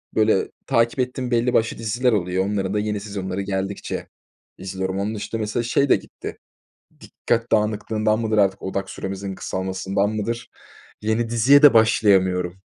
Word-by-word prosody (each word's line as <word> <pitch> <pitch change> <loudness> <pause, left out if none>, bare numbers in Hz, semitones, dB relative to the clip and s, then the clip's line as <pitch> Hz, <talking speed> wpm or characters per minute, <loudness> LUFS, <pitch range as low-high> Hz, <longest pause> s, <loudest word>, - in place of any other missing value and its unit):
böyle, 110 -3 +2
takip 115 -1 +1
ettiğim 125 0 -2
belli 120 +1 +2
başlı 110 0 +1
diziler 120 +3 0
oluyor. 95 -2 0
Onların 100 -1 -1
da 105 - +1
yeni 105 0 -2
sezonları 100 -2 -4
geldikçe 95 0 -4 0.5
izliyorum. 95 0 -4
Onun 105 +3 -2
dışında, 110 +2 -4
mesela, 110 +3 -1
şey 135 +4 +1
de - - +7
gitti. - - -8 0.6
Dikkat 115 0 -2
dağınıklığından 110 0 +1
mıdır, 110 -1 0
artık, 100 -2 +2
odak 95 0 -3
süremizin 95 0 -5
kısalmasından 95 +2 -2
mıdır? 110 +2 -3 0.5
Yeni 110 +2 0
diziye 120 +5 +5
de 145 -3 +8
başlayamıyorum. 95 -5 +3
105 Hz, 145 wpm, -22 LUFS, 95-115 Hz, 0.6 s, de